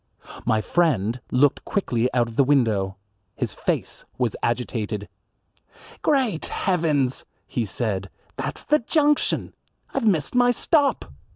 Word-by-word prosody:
My 110 - +3
friend 125 - +1
looked 135 +2 +3
quickly 125 - 0
out 120 -2 +2
of 115 - -9
the 140 - +5
window. 110 -9 +2 0.4
His - - -2
face - - -2
was 125 -3 0
agitated. 115 -3 -2 0.9
"Great 255 - +1
heavens!" 155 -8 0 0.2
he 120 - -2
said, 100 -2 -2 0.3
"that's - - -4
the 300 +1 +3
junction. 295 +4 +1 0.4
I've 225 - 0
missed 160 -9 +1
my 245 0 +4
stop. 285 +3 +1
130 Hz, 120 wpm, -24 LUFS, -, 0.9 s, the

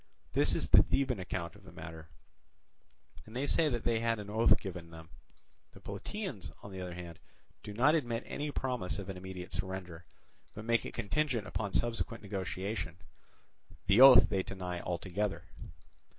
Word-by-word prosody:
This - - +3
is - - -1
the - - +10
Theban 130 -5 0
account 90 -2 -4
of 100 - -16
the 95 - -13
matter, 80 0 -9 1.2
and 110 - -12
they 130 +3 0
say 155 +2 +3
that 120 -4 -2
they 115 -1 +2
had 115 0 +1
an 105 -1 -7
oath 110 +2 +5
given 90 -4 -7
them. 80 0 -12 0.6
The - - -13
Plataeans, 185 - -5
on 100 - -8
the 95 -1 -6
other 90 -1 -5
hand, 85 -2 -8 0.4
do 105 - -7
not 125 +9 +4
admit 120 -7 0
any 150 +1 -3
promise 125 -10 -2
of 100 -1 -6
an 95 - -5
immediate 90 -1 -7
surrender, 90 -2 -4 0.5
but 105 - -7
make 115 0 +2
it - - -9
contingent 120 0 0
upon 100 +2 -3
subsequent 115 -1 -1
negotiation: 95 -2 -3 0.9
the 100 +5 +5
oath 135 -1 +10
they 95 - 0
deny 90 -2 -5
altogether. 90 0 -2
100 Hz, 165 wpm, -33 LUFS, 90-115 Hz, 1.2 s, the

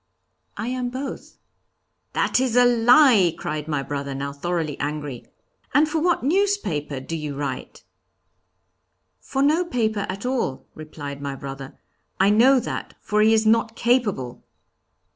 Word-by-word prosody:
'I 230 - -4
am 250 -1 -2
both.' 265 +2 -7 0.8
'That - - +1
is 255 -3 0
a 245 0 +6
lie!' 240 - +5
cried 150 0 -4
my 150 -3 -1
brother, 140 -1 -4
now 140 +1 -4
thoroughly 160 0 -2
angry. 145 -3 -4 0.5
'And 300 +2 +5
for 315 +1 -1
what 345 -4 +1
newspaper 285 - 0
do 150 +5 -6
you 150 -3 -5
write?' 140 -2 -5 1.4
'For 270 0 -2
no 310 +5 +3
paper 220 - -1
at 195 +5 -5
all,' 250 - -2
replied 145 -2 -8
my 140 -1 -4
brother, 135 0 -8 0.4
'I 190 +1 +5
know 255 +5 +5
that, - - -6
for 210 0 0
he 220 +1 +5
is 220 0 +3
not 225 +1 +2
capable.' 215 - 0
205 Hz, 145 wpm, -23 LUFS, -, 1.4 s, a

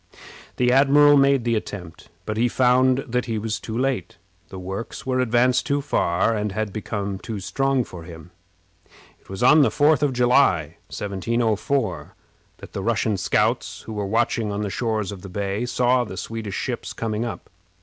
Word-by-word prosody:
The 125 0 +2
admiral 145 +2 +6
made 140 -2 +4
the 120 0 0
attempt, 95 -6 -6 0.2
but 110 - -3
he 115 +3 +2
found 130 +2 +3
that 125 0 -1
he 115 -3 -2
was 110 0 -3
too 110 0 -5
late. 130 -9 -2 0.3
The 95 - -8
works 95 +4 -6
were 130 -1 0
advanced 125 0 +2
too 140 0 +1
far, 115 -6 +1
and 105 -1 -2
had 110 -2 -3
become 100 -2 -4
too 110 0 -6
strong 135 +6 0
for 90 -6 -10
him. 80 -1 -11 0.9
It - - -28
was 95 +5 -4
on 150 +5 +7
the 140 - +4
4th 150 -1 +3
of 145 -2 +2
July, 120 - +2
1704, 105 - -2 0.4
that - - -13
the 100 - -3
Russian 110 0 0
scouts, 95 - 0
who 110 - -8
were 105 -2 -3
watching 115 0 0
on 100 +1 -3
the 100 - -3
shores 110 -4 -2
of 100 -3 -8
the 100 - -9
bay, 100 +4 -2
saw 125 0 +2
the 100 -5 -8
Swedish 110 0 -5
ships - - -4
coming 110 -1 -2
up. 120 - -7
115 Hz, 180 wpm, -23 LUFS, 100-125 Hz, 0.9 s, on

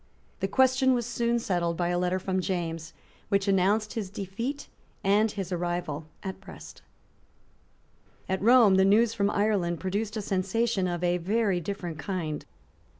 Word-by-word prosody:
The 195 - 0
question 260 +3 +3
was 240 -2 -1
soon 235 0 0
settled 175 -6 -1
by 175 0 0
a 175 0 0
letter 180 +1 +1
from 190 0 -1
James, 165 -3 -3 0.4
which 200 0 +1
announced 200 +3 +2
his 210 -5 -4
defeat 210 +9 -5 0.4
and 205 +3 +3
his 195 -3 -5
arrival 175 -3 -3 0.2
at 190 0 -6
Brest, 190 -1 -12 1.5
At 190 0 -1
Rome 225 -3 +6
the 190 - +5
news 215 +4 +4
from 200 -3 +1
Ireland 200 -5 0
produced 205 +4 -2
a - - -2
sensation 195 +1 0
of 175 0 -3
a 175 0 +2
very 200 +1 +1
different 175 -3 -5
kind. 155 -1 -3
195 Hz, 150 wpm, -27 LUFS, 175-215 Hz, 1.5 s, Rome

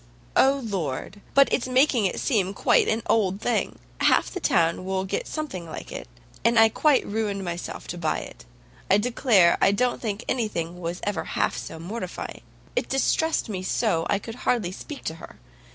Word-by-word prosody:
"O 275 +1 +4
Lord! 190 -1 -4
but 275 0 +7
it's 255 - +1
making 255 -4 +3
it - - -4
seem 200 -6 0
quite - - +3
an 220 0 0
old 195 -3 +2
thing! 240 +2 -1 0.2
Half - - +3
the 370 - -4
town 170 - +2
will 190 0 -1
get 485 - -3
something 265 - -5
like 160 - -8
it. - - -7 0.4
And 230 0 +3
I 225 0 +7
quite 295 +4 +3
ruined 205 -2 -2
myself 175 0 -5
to 175 - -5
buy 160 -2 0
it. - - -11 0.5
I 195 - +6
declare, 210 -5 +3
I - - +5
don't 245 +5 0
think 215 0 -3
anything 180 -8 -2
was 170 +1 -4
ever 205 -5 -2
half - - 0
so - - -6
mortifying. 185 +3 -6 0.3
It - - -1
distressed 320 +4 +1
me 195 -4 -4
so, 165 -3 0
I - - +3
could 225 +3 -7
hardly 215 -8 +1
speak 280 +9 -8
to 160 - -3
her. - - -11
205 Hz, 185 wpm, -25 LUFS, 180-245 Hz, 0.5 s, but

